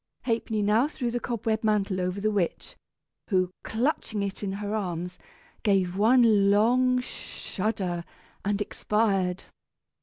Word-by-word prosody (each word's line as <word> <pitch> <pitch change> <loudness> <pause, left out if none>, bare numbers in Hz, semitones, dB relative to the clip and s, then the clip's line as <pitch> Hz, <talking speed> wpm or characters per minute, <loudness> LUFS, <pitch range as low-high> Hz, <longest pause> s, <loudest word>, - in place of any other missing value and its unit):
Ha'penny 225 -3 0
now 215 +6 +3
threw 250 -5 -3
the 245 - -1
cobweb 225 -2 -2
mantle 200 -3 +1
over 180 +2 -2
the 215 +2 +1
witch, 195 -5 -2 0.5
who, 185 -3 +2
clutching 220 -3 -1
it 195 -1 -4
in 195 -2 -2
her 205 +1 -4
arms, 180 -3 -3 0.4
gave 190 -4 +2
one 215 -2 +5
long 250 +5 +4
shudder 190 -7 -3 0.4
and 205 0 0
expired. 195 -3 0
210 Hz, 125 wpm, -27 LUFS, 190-225 Hz, 0.5 s, one